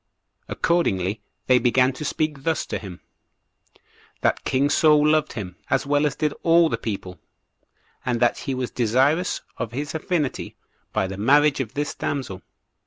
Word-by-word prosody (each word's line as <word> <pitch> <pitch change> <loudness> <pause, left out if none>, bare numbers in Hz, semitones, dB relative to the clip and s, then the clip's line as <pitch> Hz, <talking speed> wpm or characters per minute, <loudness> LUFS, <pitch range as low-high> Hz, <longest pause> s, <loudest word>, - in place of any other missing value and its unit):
Accordingly, 105 - 0 0.2
they 125 -1 +5
began 125 +2 +3
to 130 - -7
speak 150 -1 -2
thus 160 +1 -1
to - - -4
him: 95 -4 -10 1.2
That - - +1
king 140 +2 +1
Saul 150 -1 +5
loved 155 -1 +2
him, 90 -6 -6
as - - +1
well 145 +1 +2
as 140 - -4
did 150 -2 0
all 165 0 +5
the 115 - -1
people, 95 -5 -5 0.8
and 125 -2 -1
that 120 0 +2
he 135 - -3
was 125 -1 -3
desirous 135 +9 +1 0.2
of 115 - -4
his 145 +4 -4
affinity 160 -3 -2 0.4
by - - 0
the 95 0 -6
marriage 145 +7 +4
of 120 -5 -4
this 145 0 -2
damsel. 115 -10 -4
135 Hz, 160 wpm, -23 LUFS, 115-150 Hz, 1.2 s, they